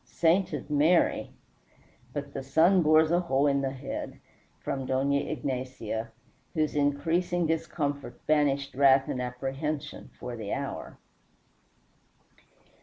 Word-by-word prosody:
"Sainted 165 -4 0
Mary, 155 +4 +3 0.8
but 140 0 -5
the 135 - -4
sun 160 +8 +4
bores 155 0 +5
a 175 - +4
hole 140 -5 +1
in 140 -1 +2
the 135 - 0
head," 135 +1 -6 0.4
from 135 -1 -3
Dona 135 +2 +1
Ignacia, 130 -6 -3 0.4
whose 155 -2 0
increasing 165 +5 +1
discomfort 150 -3 -3
banished 140 -2 +1
wrath 135 0 +5
and 125 - -2
apprehension 135 +4 -4
for 125 -1 -5
the 110 -3 -4
hour. - - -5
140 Hz, 110 wpm, -28 LUFS, 135-155 Hz, 0.8 s, bores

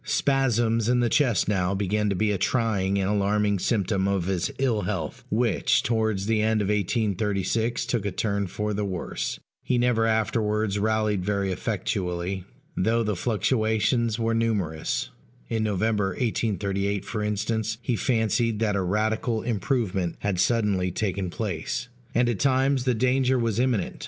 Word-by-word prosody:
Spasms 120 -4 +1
in 125 0 +3
the 120 -1 +2
chest 125 - +2
now 100 -2 +1
began 105 +2 0
to 100 - 0
be 105 +2 +1
a 100 - 0
trying 100 -4 +1
and 95 -1 0
alarming 105 0 +1
symptom 100 -2 0
of 100 -3 0
his 95 -2 -1
ill 125 -6 +1
health, 90 -6 -4
which, 105 - +2
towards 110 -3 0
the 110 0 +1
end 110 0 +2
of 105 -1 -1
1836, 105 +2 0
took 120 -3 -1
a - - -1
turn 100 +1 -1
for 105 +4 -3
the 105 +1 -1
worse; 95 -3 -3 0.2
he 125 - +1
never 120 -2 +2
afterwards 110 -2 0
rallied 110 -2 +1
very 100 -1 0
effectually, 95 -2 -2 0.3
though 115 +4 +2
the 105 -2 -1
fluctuations 110 +2 +1
were 115 -1 0
numerous 105 -9 -1 0.4
(in 115 -1 0
November, 105 0 +1
1838, 100 -3 -1
for 105 0 -3
instance, 110 +1 -1
he 125 - 0
fancied 115 -1 +1
that 105 -2 0
a 100 - +1
radical 110 +4 0
improvement 105 - -1
had 100 -3 -1
suddenly 100 -4 +2
taken 95 0 -2
place) 100 +4 -3 0.3
and 120 +1 +3
at 120 -5 -1
times 135 -1 +2
the 125 -2 +2
danger 130 +2 +2
was 115 -2 0
imminent. 120 -7 0
105 Hz, 155 wpm, -25 LUFS, 100-115 Hz, 0.4 s, in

